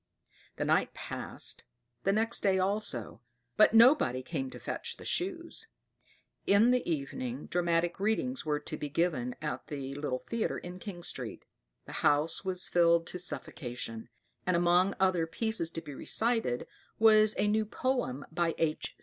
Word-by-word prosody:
The - - -2
night - - +2
passed, - - -2 0.4
the 195 - +4
next 225 +3 +1
day 195 -1 +3
also; 190 - -2 0.3
but 215 +1 +5
nobody 225 - +6
came 135 -2 -3
to - - -9
fetch - - -4
the - - -11
Shoes. 355 +3 -2 0.8
In 210 +5 +5
the 250 0 +3
evening 240 - -3
"Dramatic 170 0 0
Readings" 220 +5 0
were 150 -1 0
to 155 - -6
be 150 - -4
given 145 -6 0
at 150 - -4
the 140 -2 -5
little 140 -2 -2
theatre 230 - -2
in 180 +1 -8
King 180 -3 -8
Street. - - -4 0.4
The - - -10
house 150 +5 +2
was 185 -1 +1
filled 170 -1 +4
to 180 - -6
suffocation; 120 -9 -5 0.4
and 180 - +3
among 175 +3 +3
other 185 -3 +2
pieces 220 -2 0
to 165 - -5
be 150 -3 -9
recited 225 - 0 0.3
was 215 -1 +6
a - - +2
new 215 +1 +1
poem 220 - -1
by 165 0 0
H. 155 -2 -1
175 Hz, 155 wpm, -31 LUFS, 150-220 Hz, 0.8 s, nobody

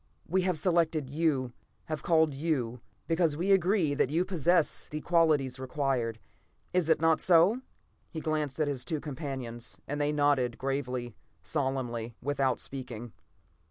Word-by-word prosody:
We 185 +3 +2
have 180 -2 0
selected 160 -4 +1
you, 140 -5 0 0.3
have 155 -2 -4
called 160 -3 +3
you, 135 -6 -2 0.2
because 165 -3 +1
we 185 +4 +1
are - - +8
agreed 180 -6 +2
that - - +3
you 165 +5 +1
possess 175 -2 +1
the 150 - -4
qualities 150 -6 +2
required. 130 -4 -1 0.6
Is 180 -3 +2
it 160 - +4
not 165 0 +3
so?" 185 +7 +5 0.5
He 160 - -5
glanced 155 -2 -2
at 155 - +2
his 135 -3 -2
two 150 +4 -2
companions, 130 -5 -6
and 145 +1 -2
they 145 0 +2
nodded 145 -5 +2
gravely, 130 -3 -3 0.3
solemnly, 125 -5 -2
without 135 -2 0
speaking. 120 -4 -6
145 Hz, 150 wpm, -30 LUFS, 130-165 Hz, 0.6 s, are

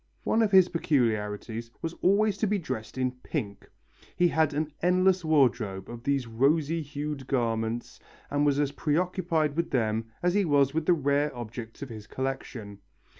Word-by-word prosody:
One 225 - +2
of 220 - +3
his 190 -2 +7
peculiarities 115 - -1
was 165 0 -2
always 205 +2 +3
to 220 - +1
be 205 +1 +1
dressed 120 - -5
in 130 -1 +1
pink. 100 -11 -5 0.5
He 175 -1 +4
had 160 -2 +2
an 155 +1 -2
endless 185 +1 +3
wardrobe 120 -11 +2
of 120 0 -8
these 140 -2 +1
rosy 145 +8 +1
hued 145 -2 -5
garments 115 -3 -1 0.3
and 145 0 +1
was 145 -1 +2
as 145 -1 +1
preoccupied 160 0 0
with 170 +1 -1
them 110 -2 0 0.2
as 180 0 +3
he 205 0 +3
was 140 -4 +3
with 160 0 -1
the 180 - +6
rare 145 -1 +1
objects 115 +2 -7
of 135 - -7
his 110 -2 -9
collection. 130 -6 -5
140 Hz, 170 wpm, -28 LUFS, 115-165 Hz, 0.5 s, his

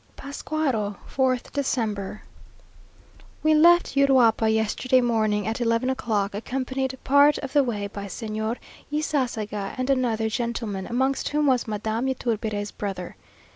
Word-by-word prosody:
PASCUARO, 275 -7 -2 0.2
4th 260 -2 +1
December. 215 -8 -2 1.2
We 310 0 +4
left 345 +3 +5
Uruapa 250 -5 +4
yesterday 220 +4 +2
morning 215 -4 +1
at 225 +3 -2
eleven 230 +2 +1
o'clock, 215 -6 -1
accompanied 260 +4 -3
part 285 +2 +5
of 275 -1 -6
the 290 -1 +5
way 215 -5 -2
by 200 0 -6
Señor 220 +2 -3 0.3
Ysasaga 235 -9 -2
and 255 +1 0
another 235 -4 +1
gentleman, 225 -4 -3
amongst 265 +3 0
whom 300 0 +1
was 255 -4 +2
Madame 220 +3 -2
Yturbide's 220 -5 -2
brother. 195 -3 -5
235 Hz, 125 wpm, -25 LUFS, 215-265 Hz, 1.2 s, left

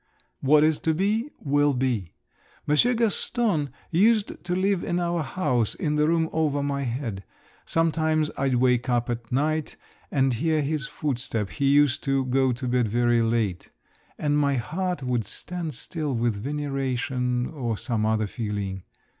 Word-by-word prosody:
What 150 +2 +5
is 155 -1 +2
to 160 -1 0
be, 215 - 0
will 145 0 +2
be. 125 -9 -1 0.5
Monsieur 190 +12 +3
Gaston 225 - +1 0.2
used 210 +5 +2
to 175 0 -1
live 190 0 +1
in 175 - -1
our 170 -1 0
house, 130 - +1
in 150 -1 -1
the 150 0 +3
room 165 0 +2
over 145 -3 +1
my 140 -1 -1
head. 115 -5 -4 0.4
Sometimes 160 -1 +1
I'd 135 -2 +1
wake 125 0 +2
up 120 0 +1
at 115 -1 -6
night 155 +4 0 0.3
and 135 -2 +2
hear 155 +5 +1
his 145 -1 -2
footstep—he 120 - -3
used 145 -1 +4
to 135 -1 +1
go 130 0 +2
to 125 +1 -4
bed 125 -1 +2
very 120 +2 +2
late—and 115 - -2
my 140 -1 +2
heart 175 +6 -2
would 125 -3 0
stand 165 - -6
still 150 -6 -3
with 120 0 +1
veneration, 130 -1 -2
or 120 -7 -3
some 115 0 -1
other 110 0 +1
feeling. 100 -3 -4
140 Hz, 150 wpm, -25 LUFS, 120-155 Hz, 0.5 s, What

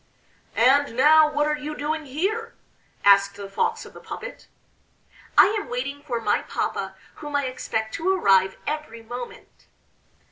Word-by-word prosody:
"And 260 +1 +3
now, 305 +3 +6
what 295 0 +1
are 300 0 +1
you 300 0 -6
doing 310 +1 -3
here?" 425 - -2 0.5
asked 200 0 +5
the 200 -1 -7
Fox 195 - -1
of - - -13
the - - -11
puppet. - - -9 0.9
"I 415 - +7
am - - -11
waiting 275 +4 -4
for 245 -5 -3
my 230 - +1
papa, - - -3 0.2
whom 295 -1 -6
I 285 -1 +1
expect 220 -3 -3
to 355 +4 0
arrive 190 - +3
every 300 -7 -5
moment." 245 +2 -9
285 Hz, 150 wpm, -24 LUFS, 230-305 Hz, 0.9 s, I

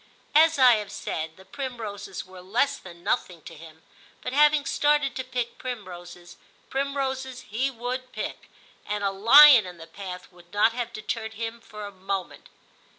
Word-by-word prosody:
As 320 +1 +5
I 250 -4 +7
have 205 -2 -6
said, 160 -3 -5
the 190 - -16
primroses 215 -8 -6
were 185 0 -13
less 230 +10 0
than 175 -2 -13
nothing 170 -4 -2
to - - -10
him, 160 0 -14 0.4
but 250 - -4
having 300 0 +4
started 295 -2 +2
to 260 - -3
pick 250 -2 -4
primroses, 175 -7 -8 0.3
primroses 265 -2 -2
he 250 +6 -2
would 255 +1 -5
pick, - - -6 0.4
and 210 0 -2
a 200 - +1
lion 235 +3 +8
in 180 -1 -10
the 165 - -10
path 180 +1 -9
would 175 -1 -20
not 210 +2 +3
have 240 -1 -4
deterred 220 0 -5
him 230 +1 -5
for 210 -2 -9
a 205 - -7
moment. 190 -1 -5
220 Hz, 165 wpm, -26 LUFS, 185-260 Hz, 0.4 s, lion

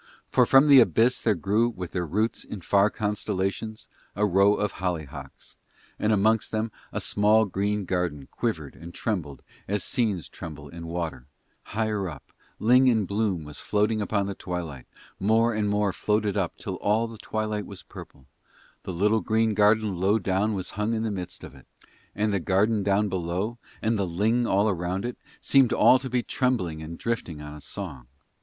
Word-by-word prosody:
For - - +4
from 135 +2 +6
the 140 -2 +9
abyss 120 +1 +3
there 110 -3 +2
grew 105 +8 +1
with 90 -7 -7
their 90 -2 -2
roots 105 +8 -1
in 100 - -8
far 100 +4 +3
constellations 105 0 -3 0.3
a 105 +2 +2
row 100 +1 +4
of 105 - -1
hollyhocks, 80 -6 -5 0.4
and 105 - +1
amongst 110 +1 +2
them 110 +1 -1 0.2
a - - -2
small 105 +2 +3
green 100 +1 -1
garden 85 -7 -2
quivered - - -3
and 85 +2 -11
trembled 85 -11 -3 0.2
as 105 +1 -1
scenes 105 -8 0
tremble 75 -2 -9
in 85 +2 -8
water; 80 -7 -4 0.5
higher 105 -4 0
up, 75 -4 -11 0.3
ling 125 +4 +5
in 110 -5 +3
bloom 100 -4 -1
was 75 -2 -9
floating 105 +1 +1
upon 100 -1 0
the 100 - -3
twilight, 85 -8 -6 0.3
more 115 +3 +3
and 105 -1 0
more 105 -1 +1
floated 105 0 0
up 95 -5 -1
till 95 -4 -5
all 110 +5 +1
the 115 -2 -11
twilight 110 -2 -3
was 100 - -9
purple; 65 - -12 0.6
the - - -6
little 105 +5 +2
green 110 0 +1
garden 105 -1 +3
low 100 +4 +3
down 100 +2 0
was 95 - -4
hung 105 +2 -1
in 110 - -1
the 110 - -1
midst 90 -3 -6
of - - -9
it. - - -17 0.5
And 105 0 0
the 100 - +1
garden 100 +5 +2
down 100 +1 +2
below, 95 +5 -2 0.2
and 110 -1 +1
the 95 - 0
ling 110 +8 +1
all 100 +1 +3
round 90 +4 -3
it, 120 - -5 0.2
seemed 135 -3 +4
all 130 - +6
to 130 0 -6
be 125 -1 0
trembling 105 - -1
and 80 +2 -7
drifting 115 -9 -3
on 75 0 -8
a 75 - -10
song. 70 -4 -7
105 Hz, 180 wpm, -26 LUFS, 90-110 Hz, 0.6 s, the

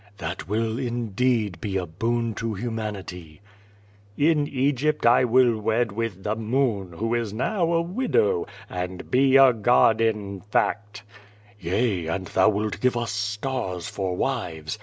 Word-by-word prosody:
'^ - - -30
"That 85 0 -5
will, 110 +2 -1
indeed, 120 -5 -1
be 100 -2 -2
a 90 - -2
boon 115 +7 -1
to 115 0 -3
humanity/' 100 -7 -6 0.8
"In 150 -1 +3
Eg}i3t 140 +2 0
I 120 +2 +5
will 120 -2 +3
wed 110 +1 0
with 105 -3 -4
the 105 +1 -1
Moon, 110 -5 -1
who 115 +7 -2
is 115 -3 -1
now 170 - 0
a 165 0 +2
widow, 420 - 0 0.2
and 90 0 -6
be 135 +1 +5
a 135 -2 +7
god 115 0 +3
in 105 -4 -1
fact/^ 105 +2 -1 0.6
"Yea, 95 -1 0
and 95 +3 -2
thou 95 +3 +3
wilt 105 0 -2
give 125 -1 +2
us 120 -1 -2
stars 105 -3 -3
for 95 -2 -3
wives. 80 +1 -3
110 Hz, 150 wpm, -24 LUFS, 100-125 Hz, 0.8 s, a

